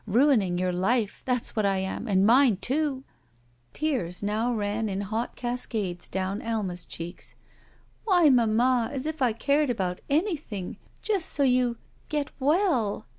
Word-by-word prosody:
Ruining 215 -5 +3
your 185 0 0
life! 205 +4 0
That's 250 -2 -1
what 215 - +1
I 195 -1 +2
am, 190 +5 -3
and 195 -2 +3
mine, 240 -2 +5
too!" 270 +5 -1 0.7
Tears 245 - -2
now 215 +4 0
ran 215 -1 -1
in 195 0 -2
hot 220 +4 -3
cascades 225 -7 -3
down 190 +2 -3
Alma's 200 -6 -3
cheeks. 170 +2 -7 0.7
"Why, 360 -6 +5
mamma, 240 0 +3
as 275 -1 -4
if 315 -1 -4
I 250 -3 +4
cared 280 +6 +1
about 185 -6 -2
anything 290 - -2
— - - -34
just 400 -6 0
so 285 - 0
you 250 -2 +2 0.2
— - - -34
get 295 -2 -2
well." 285 - +1
230 Hz, 155 wpm, -26 LUFS, 200-275 Hz, 0.7 s, mine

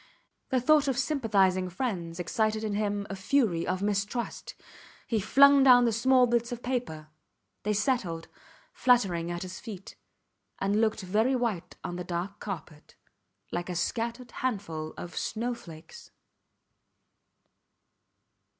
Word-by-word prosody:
The 260 - +2
thought 295 +3 +4
of 265 -3 0
sympathizing 200 -10 +2
friends 180 -5 -3
excited 215 +4 0
in 215 -2 -2
him 205 -1 -1
a - - -3
fury 190 -4 +1
of 185 +1 -1
mistrust. 205 +3 -2 0.5
He 225 - 0
flung 280 +7 +6
down 250 -2 +7
the 230 - +2
small 255 +3 +4
bits 235 0 0
of 240 0 -6
paper. 235 -12 -3 0.5
They 210 - 0
settled, 210 -7 -1 0.5
fluttering 195 -10 +2
at 175 +1 -4
his 185 0 -7
feet, 200 -5 -9 0.6
and 200 +2 +1
looked 220 -1 +1
very 215 +8 +1
white 210 -8 -2
on 175 - -4
the 180 - -4
dark 180 +4 -4
carpet, 160 -6 -8 0.6
like 175 +1 -3
a 180 - -3
scattered 235 +6 -2
handful 180 -11 -3
of 175 - -8
snow 235 +3 -2
flakes. 170 - -12
210 Hz, 130 wpm, -28 LUFS, 180-245 Hz, 0.6 s, down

